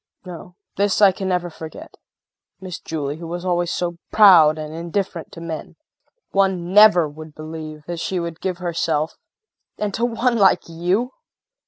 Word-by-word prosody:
No, 180 0 -10 0.2
this 200 0 +1
I 200 -2 +7
can 190 +1 -5
never 180 -2 -1
forget. 160 -1 -10 0.7
Miss 185 -2 -7
Julie 150 -2 -4
who 170 0 -8
was 175 +2 -5
always 175 -1 0
so 175 -1 -2
proud 170 -7 +7
and 155 0 -6
indifferent 170 +1 -4
to - - -9
men! 160 -2 -6 0.6
One 190 -2 0
never 205 -6 +7
would 155 +1 -11
believe 155 -1 -8
that 170 0 -5
she 185 +2 -2
would 170 -1 -5
give 185 -2 -2
herself 165 -3 -1 0.6
and 210 -1 -2
to 230 - -2
one 235 0 0
like 195 -2 +4
you! 180 +9 -1
175 Hz, 160 wpm, -21 LUFS, 160-190 Hz, 0.7 s, I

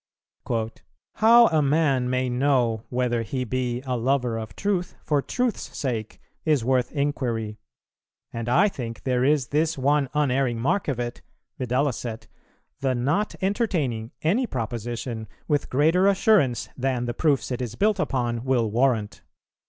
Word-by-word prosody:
"How 235 +2 +7
a 155 -1 +3
man 140 -3 +2
may 130 0 0
know 125 -3 +1
whether 125 -2 0
he 125 +4 -3
be 125 0 -2
[a 130 -1 -1
lover 125 -1 0
of 110 -4 -6
truth 190 -3 -1
for 145 -2 +1
truth's 245 - -2
sake] 115 -6 -3 0.2
is 150 -7 +2
worth 125 -1 +1
inquiry; 120 -7 -2 0.7
and 115 0 -3
I 175 +12 +5
think 115 - -6
there 125 -1 +1
is 140 -2 +2
this 155 +2 +1
one 140 0 +2
unerring 135 -4 +1
mark 175 +11 0
of 135 -5 -1
it, 120 0 -4 0.4
viz. 130 - -2 1.1
the 130 -2 0
not 145 +12 0
entertaining 160 - 0
any 220 +11 +2
proposition 115 - -4 0.2
with 145 -1 0
greater 160 +8 +3
assurance 195 - +3
than 130 -2 -1
the 120 - -2
proofs 140 0 +1
it 125 - -2
is 120 -2 -4
built 210 - +2
upon, 120 -8 -1
will 125 -5 +1
warrant. 115 -3 +1
130 Hz, 145 wpm, -25 LUFS, 120-150 Hz, 1.1 s, How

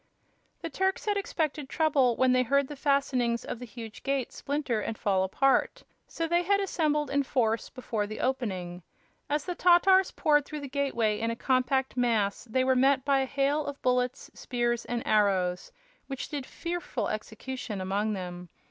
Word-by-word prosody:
The 330 - -3
Turks 380 0 0
had 415 -1 +1
expected 310 -7 -2
trouble 280 -7 +2
when 260 +1 +3
they 255 0 +4
heard 280 +3 +2
the 295 - -6
fastenings 265 -4 +1
of - - -5
the 245 - -8
huge 225 -1 -9
gate 275 -3 -1
splinter 280 -6 -2
and 220 +1 -4
fall 190 -2 +1
apart, 265 +8 +1 0.2
so 330 - -3
they 345 +1 +2
had 400 +3 +2
assembled 305 -6 0
in 285 +1 +2
force 230 -4 0
before 225 -5 -3
the 215 - -7
opening. 185 -9 -2 0.5
As 295 0 0
the 360 - -2
Tatars 365 +2 +5
poured 295 -1 +2
through 300 +1 -7
the 280 - -5
gateway 255 -6 0
in 230 - -1
a 230 - -2
compact 260 +1 +1
mass 225 -5 +1
they 255 +3 0
were 260 0 +3
met 265 +1 +3
by 280 -1 +3
a 265 - +1
hail 280 +3 +1
of 285 -1 -6
bullets, 250 0 0
spears 240 -1 -2
and 240 -1 -3
arrows, 190 -4 +1 0.4
which 270 -2 -5
did 285 -4 -5
fearful 340 -10 -4
execution 220 0 -5
among 200 +3 -1
them. 180 -2 -6
260 Hz, 175 wpm, -28 LUFS, 225-285 Hz, 0.5 s, Tatars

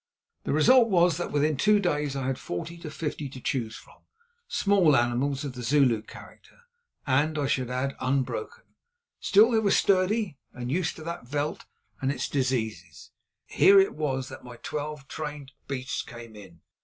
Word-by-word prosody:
The - - -1
result 230 - +5
was 175 -4 +3
that 175 - -4
within 150 +1 +1
two 210 +8 +4
days 150 -7 -1
I 135 -1 -3
had 130 -1 -2
forty 170 - -6
or 155 - -5
fifty 150 -2 -4
to 130 - -10
choose 115 -3 -2
from, - - -15 0.5
small 200 - +3
animals 130 +4 +1
of 135 - -5
the 125 - -7
Zulu 125 -3 +3
character 485 - -15 0.4
and, 150 +3 +1
I 145 - 0
should 130 -2 0
add, 130 +2 -2
unbroken. 140 - -2 0.6
Still 215 +4 +5
they 225 - +3
were 210 -2 +1
sturdy 190 -4 +2
and 125 0 -5
used 175 +2 0
to 160 - -10
that 170 -6 -6
veld 145 +3 -3 0.3
and 135 0 +1
its 135 -2 -3
diseases. 110 - -3 0.3
Here 195 0 +6
it 195 - +3
was 135 -4 -2
that 130 - -10
my 125 -1 -10
twelve 150 -2 -5
trained 150 -3 -6 0.2
beasts 130 -1 -3
came 115 -2 -11
in. 95 -5 -14
145 Hz, 170 wpm, -27 LUFS, 130-170 Hz, 0.6 s, Here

